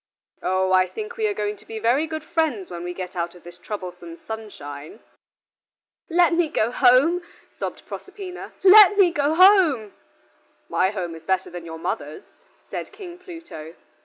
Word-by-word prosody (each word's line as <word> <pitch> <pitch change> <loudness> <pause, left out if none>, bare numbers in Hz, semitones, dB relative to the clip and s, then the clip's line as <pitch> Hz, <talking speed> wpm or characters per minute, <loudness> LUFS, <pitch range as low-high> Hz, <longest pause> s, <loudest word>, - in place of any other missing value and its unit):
Oh, 185 +1 0
I 185 0 +4
think 440 - -7
we 440 -2 0
are 415 - -1
going 210 0 -2
to - - -19
be 225 - -6
very 245 +8 +1
good 315 -1 -5
friends 315 - -1
when 170 0 -6
we 175 - -4
get 180 +1 -7
out 170 0 -3
of 175 - -16
this 175 0 -13
troublesome 180 -4 -7
sunshine." 155 -11 -9 1.1
"Let 345 0 +4
me 335 -2 +2
go 225 -3 0
home," 265 +8 +4 0.3
sobbed - - -6
Proserpina, 385 -2 -8
"let 405 +1 +8
me 375 -4 +5
go 295 -1 0
home." 345 - +5 0.7
"My 185 - +1
home 185 -5 -4
is 165 - -10
better 190 +3 -1
than 175 -1 -8
your 165 0 -7
mother's," 150 -2 -5 0.5
said - - -5
King 370 -4 -10
Pluto. 330 - -10
225 Hz, 165 wpm, -23 LUFS, -, 1.1 s, let